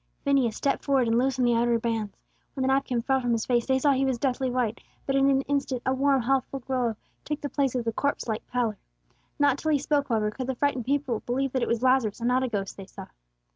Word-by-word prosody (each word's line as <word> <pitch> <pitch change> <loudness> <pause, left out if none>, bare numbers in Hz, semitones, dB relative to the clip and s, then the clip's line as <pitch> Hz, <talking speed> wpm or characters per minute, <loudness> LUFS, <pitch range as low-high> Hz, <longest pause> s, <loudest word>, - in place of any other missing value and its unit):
Phineas 270 -6 +2
stepped 280 - -1
forward 270 -4 +2
and 230 +1 +3
loosened 260 0 +1
the 240 - +3
outer 235 0 +2
bands. 225 -3 -3 0.4
When 265 - -2
the 260 - +1
napkin 265 -3 +1
fell 265 +1 +1
from 245 -1 0
his 225 -1 -1
face, 240 -2 +1
they 265 -1 +3
saw 285 +2 +3
he 270 0 +2
was 265 -2 0
deathly 260 0 0
white; 245 -3 -1 0.3
but 270 - 0
in 275 0 +4
an 270 -1 +3
instant 275 -3 -2
a 260 - +2
warm, 270 -1 +2
healthful 270 +1 0
glow 245 -3 -1 0.3
took 300 0 -3
the 285 - -4
place 275 -3 0
of 245 -2 -1
the 230 - -1
corpse 285 +1 -1
like 220 -1 -2
pallor. 235 -4 -1 0.6
Not 285 -2 +3
till 315 - -2
he 300 - +4
spoke, 285 0 0
however, 215 -2 +1
could 255 +3 -5
the 265 - -2
frightened 260 -3 0
people 270 -4 0
believe 265 +2 0
that 260 - -1
it - - 0
was 235 +1 -1
Lazarus, 255 -5 +3
and 235 - -1
not 255 +1 +2
a 260 - 0
ghost 200 -4 -4
they 195 -1 -9
saw. 195 -1 -10
255 Hz, 250 wpm, -26 LUFS, 235-275 Hz, 0.6 s, in